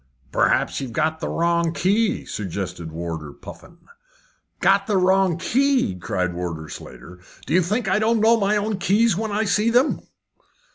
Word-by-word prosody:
"Perhaps - - +1
you've 130 -4 -6
got 155 +2 0
the - - -3
wrong 170 0 +1
key?" 205 +5 +1
suggested 90 -4 -5
Warder 80 -2 -5
Puffin. 170 - -13 0.8
"Got 195 +1 +3
the 205 -3 +1
wrong 190 -2 +3
key!" 265 - +1
cried 90 -1 -2
Warder 85 -3 -5
Slater. 80 +10 -11 0.3
"Do - - -3
you 185 - +5
think 210 +6 -1
I 190 +2 +2
don't 225 +1 +2
know 225 +2 +4
my 205 +1 +2
own 210 -1 -2
keys 210 +3 +3
when 220 +2 -3
I 210 +2 0
see 210 +2 +2
them?" 250 +5 +2
185 Hz, 160 wpm, -22 LUFS, -, 0.8 s, you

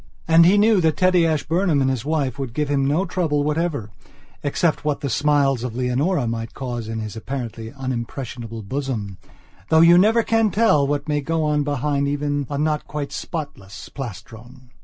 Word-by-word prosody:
And 165 +1 +6
he 195 +3 +5
knew 210 -2 +4
that 160 -3 +1
Teddy 185 -2 +4
Ashburnham 160 +1 +1
and 135 - +2
his 130 -3 -1
wife 145 -4 -1
would 130 -3 -5
give 150 -1 -1
him 135 -1 +1
no 155 +7 +1
trouble 160 -5 0
whatever 150 -7 -2 0.5
except 155 +2 0
what 150 -2 -1
the 140 - -2
smiles 140 -2 +2
of 125 -3 -4
Leonora 130 +5 0
might 115 0 -4
cause 120 -4 -5
in 110 0 -4
his 110 0 -6
apparently 115 -2 -6
unimpressionable 120 -3 -5
bosomthough 115 - -2
you 175 +1 +7
never 225 +4 +4
can 225 -1 +2
tell 200 -11 +3
what 145 +1 -2
may 150 -1 0
go 160 +3 -1
on 150 -1 +1
behind 145 0 -1
even 145 -1 -1
a 145 - -3
not 150 0 -1
quite 145 -2 -4
spotless 140 - -7
plastron! 120 +1 -10
145 Hz, 175 wpm, -22 LUFS, 125-160 Hz, 0.5 s, you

